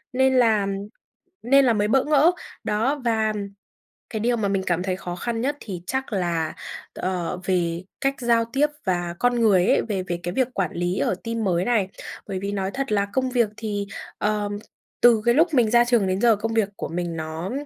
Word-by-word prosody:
nên 265 Hz, +1 st, +3 dB
là 220 Hz, -5 st, +4 dB, 0.8 s
nên 275 Hz, +3 st, +5 dB
là 245 Hz, -, +4 dB
mới 210 Hz, -1 st, +1 dB
bỡ 265 Hz, +4 st, +3 dB
ngỡ. 300 Hz, +2 st, +5 dB, 0.3 s
Đó, 255 Hz, +8 st, 0 dB
và 220 Hz, -2 st, +1 dB, 0.8 s
cái 220 Hz, -, -3 dB
điều 240 Hz, +2 st, +1 dB
mà 210 Hz, -, 0 dB
mình 195 Hz, -1 st, 0 dB
cảm 175 Hz, 0 st, +1 dB
thấy 185 Hz, -1 st, -1 dB
khó 180 Hz, -1 st, -6 dB
khăn 225 Hz, +4 st, -3 dB
nhất 285 Hz, +4 st, -1 dB
thì 185 Hz, -5 st, -7 dB
chắc 265 Hz, -3 st, -2 dB
là 170 Hz, -4 st, -1 dB, 0.4 s
t -, -, -19 dB
ờ, 180 Hz, -1 st, -2 dB
về 175 Hz, -2 st, 0 dB, 0.2 s
cách 275 Hz, 0 st, +1 dB
giao 235 Hz, -1 st, +3 dB
tiếp 290 Hz, +2 st, +3 dB, 0.2 s
và 175 Hz, -2 st, -1 dB
con 245 Hz, -1 st, +2 dB
người 195 Hz, -5 st, +4 dB
ấy, -, -, +4 dB
về 195 Hz, -4 st, -3 dB
về 175 Hz, -1 st, -3 dB
cái 175 Hz, -, -3 dB
việc 260 Hz, +3 st, +2 dB
quản 190 Hz, -4 st, -1 dB
lý 175 Hz, +2 st, -1 dB
ở -, -, +1 dB
team 230 Hz, -1 st, -2 dB
mới 180 Hz, -2 st, +1 dB
này. 220 Hz, -6 st, +2 dB, 0.4 s
Bởi 195 Hz, -2 st, -3 dB
vì 200 Hz, +1 st, -3 dB
nói 195 Hz, -1 st, -2 dB
thật 270 Hz, -2 st, -3 dB
là 200 Hz, -1 st, +2 dB
công 260 Hz, +2 st, +1 dB
việc 240 Hz, -4 st, +2 dB
thì, 205 Hz, -2 st, -3 dB, 0.3 s
ờm, 205 Hz, -1 st, -1 dB, 0.4 s
từ 235 Hz, -3 st, +6 dB
cái 235 Hz, -, +5 dB
lúc 325 Hz, +1 st, +3 dB
mình 235 Hz, -6 st, +3 dB
ra 240 Hz, 0 st, +5 dB
trường 235 Hz, -5 st, +2 dB
đến 185 Hz, +1 st, -1 dB
giờ 235 Hz, -2 st, +5 dB
công 225 Hz, +2 st, -3 dB
việc 220 Hz, -3 st, +2 dB
của -, -, -4 dB
mình 175 Hz, 0 st, -3 dB
nó 160 Hz, +4 st, -4 dB
210 Hz, 215 wpm, -24 LUFS, 185-240 Hz, 0.8 s, từ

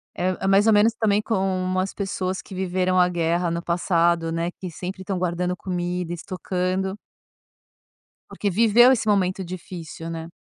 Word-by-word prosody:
É 180 Hz, +1 st, 0 dB
é -, -, +1 dB
mais 200 Hz, +3 st, +4 dB
ou 220 Hz, -, +6 dB
menos 215 Hz, +2 st, +5 dB
também 210 Hz, -1 st, +2 dB
como 190 Hz, -3 st, 0 dB
as 190 Hz, +1 st, -2 dB
pessoas 190 Hz, -2 st, -3 dB
que 195 Hz, -, -12 dB
viveram 185 Hz, 0 st, +1 dB
a 180 Hz, -, +5 dB
guerra 170 Hz, 0 st, 0 dB
no 170 Hz, 0 st, -2 dB
passado, 170 Hz, -1 st, +1 dB
né, 165 Hz, +1 st, -1 dB
que 185 Hz, -1 st, -8 dB
sempre 185 Hz, +3 st, -6 dB
estão 190 Hz, -1 st, -3 dB
guardando 180 Hz, 0 st, -1 dB
comida, 180 Hz, -1 st, -3 dB
estocando 185 Hz, +2 st, -2 dB, 1.3 s
porque 205 Hz, -, -2 dB
viveu 230 Hz, +5 st, +6 dB
esse 225 Hz, -3 st, 0 dB
momento 190 Hz, -2 st, +1 dB
difícil, 170 Hz, -2 st, -7 dB
né. 165 Hz, 0 st, -6 dB
185 Hz, 160 wpm, -23 LUFS, 175-195 Hz, 1.3 s, ou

